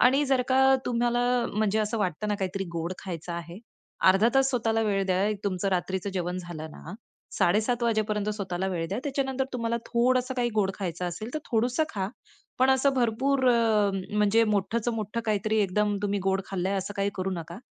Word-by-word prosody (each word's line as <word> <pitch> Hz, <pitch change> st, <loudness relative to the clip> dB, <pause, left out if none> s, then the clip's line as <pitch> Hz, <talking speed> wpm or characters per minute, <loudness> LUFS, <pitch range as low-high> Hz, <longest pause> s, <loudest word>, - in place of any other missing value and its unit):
आणि 270 Hz, +4 st, +5 dB
जर 265 Hz, -2 st, +2 dB
का 265 Hz, +1 st, +5 dB
तुम्हाला 240 Hz, 0 st, +1 dB, 0.3 s
म्हणजे 215 Hz, 0 st, +1 dB
असं 215 Hz, +1 st, -1 dB
वाटत 185 Hz, -1 st, -2 dB
ना, 210 Hz, -, +1 dB
काहीतरी 195 Hz, 0 st, -2 dB
गोड 165 Hz, +2 st, -2 dB
खायचं 170 Hz, -2 st, -6 dB
आहे. 170 Hz, +2 st, -6 dB, 0.5 s
अर्धा 195 Hz, +4 st, +4 dB
तास 270 Hz, 0 st, +4 dB
स्वतःला 225 Hz, -3 st, +1 dB
वेळ 200 Hz, -2 st, +1 dB
द्या. 185 Hz, +1 st, +1 dB, 0.2 s
तुमचं 195 Hz, 0 st, -1 dB
रात्रीचं 190 Hz, +1 st, -1 dB
जेवण 180 Hz, -1 st, -2 dB
झालं 165 Hz, -3 st, -7 dB
ना, 165 Hz, +5 st, -10 dB, 0.4 s
7:30 220 Hz, +7 st, +2 dB
वाजेपर्यंत 215 Hz, -2 st, 0 dB
स्वतःला 190 Hz, -3 st, -2 dB
वेळ 170 Hz, -3 st, -2 dB
द्या. 200 Hz, -, -2 dB
त्याच्यानंतर 270 Hz, -2 st, -1 dB
तुम्हाला 230 Hz, -2 st, -1 dB
थोडंसं 255 Hz, +2 st, +1 dB
काही 245 Hz, -1 st, +1 dB
गोड 200 Hz, -3 st, +2 dB
खायचं 180 Hz, -2 st, -4 dB
असेल 215 Hz, +8 st, -6 dB
तर -, -, 0 dB
थोडंसं 245 Hz, +5 st, +1 dB
खा. 195 Hz, -2 st, -2 dB, 0.5 s
पण 260 Hz, +1 st, +4 dB
असं 265 Hz, +1 st, +4 dB
भरपूर 260 Hz, +3 st, +1 dB
अ, 220 Hz, -4 st, +3 dB, 0.3 s
म्हणजे 210 Hz, +2 st, +4 dB
मोठंचं 215 Hz, +3 st, 0 dB
मोठं 215 Hz, +1 st, -3 dB
काहीतरी 215 Hz, +1 st, +1 dB
एकदम 205 Hz, +2 st, +1 dB
तुम्ही 205 Hz, 0 st, 0 dB
गोड 190 Hz, 0 st, +2 dB
खाल्लंय 195 Hz, +1 st, -1 dB
असं 195 Hz, +2 st, -5 dB
काही 200 Hz, 0 st, 0 dB
करू 190 Hz, +1 st, -2 dB
नका. 170 Hz, +1 st, -6 dB
210 Hz, 180 wpm, -27 LUFS, 190-240 Hz, 0.5 s, आणि